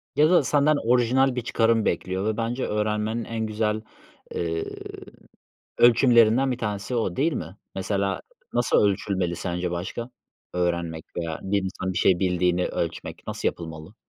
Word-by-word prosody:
Ya 155 +2 +5
da 175 -5 +5
senden 145 +2 +3 0.2
orijinal 125 +2 +3
bir 125 - -1
çıkarım 115 -1 +2
bekliyor 95 +3 -1
ve 110 0 0
bence 120 +3 -1
öğrenmenin 105 +2 -1
en 115 -1 -3
güzel, 110 0 -1 0.5
ııı, 80 -1 -1 1.2
ölçümlerinden 120 +1 +5
bir 125 - -4
tanesi 105 +2 -3
o 110 -7 -1
değil 155 +4 +2
mi? 95 - -5 0.2
Mesela 100 0 -1 0.3
nasıl - - +2
ölçülmeli 95 -3 -1
sence 90 -1 -2
başka 95 +8 -4 0.4
öğrenmek 85 -2 -1
veya 85 -2 -3
bir 100 +1 +1
insan 95 0 -3
bir - - -2
şey 90 -2 +4
bildiğini 90 -1 +1
ölçmek - - -4
nasıl - - -1
yapılmalı? 80 +3 -8
105 Hz, 145 wpm, -25 LUFS, 90-115 Hz, 1.2 s, Ya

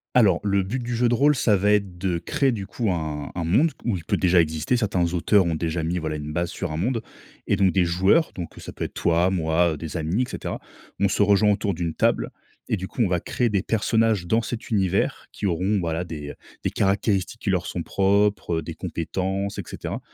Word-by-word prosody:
Alors, 100 -8 +5
le 100 -1 +2
but 100 +7 -3
du 120 0 -3
jeu 120 +1 +2
de 120 - +3
rôle, 145 +4 +4
ça 115 -5 +3
va 105 +2 +2
être 100 -4 +1
de 90 -1 -1
créer, 135 - +1
du 100 -5 -4
coup, 105 0 -1
un 75 -4 -3
un 85 - -3
monde, 130 - +3
ou 115 -5 0
il 85 - -9
peut - - +1
déjà 90 -1 +3
exister. 80 +9 0
Certains 95 -7 0
auteurs 95 +3 +3
ont 85 - 0
déjà 80 +1 -2
mis, 85 +3 -1
voilà, 80 -2 -2
une 75 0 -6
base 85 +1 -1
sur 90 -4 -4
un 75 - -3
monde, 115 +7 0 0.5
et - - +3
donc 95 -2 +3
des 90 - +3
joueurs 95 - +3
donc 85 -3 -6
ça - - -8
peut - - -5
être - - -5
toi, 85 +2 +2
moi, 85 -1 +2
des 80 +2 -5
amis, 80 +8 0
et 125 - -1
cetera - - -5 0.4
on 100 - +3
se 100 - +2
rejoint 105 +1 +4
autour 100 -1 0
d'une 85 -1 -3
table - - +1 0.4
et 110 - +1
du 95 0 -5
coup, 125 - -4
on - - +2
va 90 -1 +1
créer 120 +7 -1
des 100 -3 +1
personnages 110 -3 +1
dans 110 +5 +2
cet 115 +1 -5
univers, 95 -4 0
qui 100 - -2
auront, 95 +4 +1
voilà, 85 -1 -1
des 75 -3 -7 0.3
des - - +1
caractéristiques 100 +1 0
qui - - -2
leur 90 -3 +1
sont 85 - -3
propres, 100 -2 +1
heu, - - -4
des 80 +1 -7
compétences, 95 +3 -3
et - - -3
cetera, - - -5
95 Hz, 235 wpm, -24 LUFS, 85-105 Hz, 0.5 s, Alors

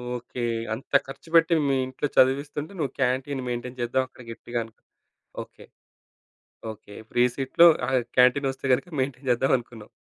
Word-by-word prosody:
Okay. 125 0 -6 0.3
అంత 120 +5 -9
ఖర్చు 135 +4 -11
పెట్టి 165 +1 +5
మీ 135 - +2
ఇంట్లో 130 +3 -3
చదివిస్తుంటే 145 +5 +2
నువ్వు 145 -4 -1
క్యాంటీన్ 130 +1 0
మెయింటైన్ 125 +1 -5
చేద్దాం 120 +2 +1
అక్కడ 130 0 -15
గట్టిగా 120 +1 -5
అనుకున్నావు. 110 0 -19 0.6
ఓకే. - - -18 1.1
ఓకే. 105 -1 -13 0.2
ఫ్రీ 120 - +3
సీట్‌లో 140 +5 +5 0.2
ఆహ్, 130 -1 +2 0.2
క్యాంటీనొస్తే 135 +2 +3
గనుక 180 +8 -1
మెయింటైన్ 130 0 -4
చేద్దాం 125 +2 +1
అనుకున్నావు. 115 -3 -11
130 Hz, 145 wpm, -25 LUFS, 120-140 Hz, 1.1 s, పెట్టి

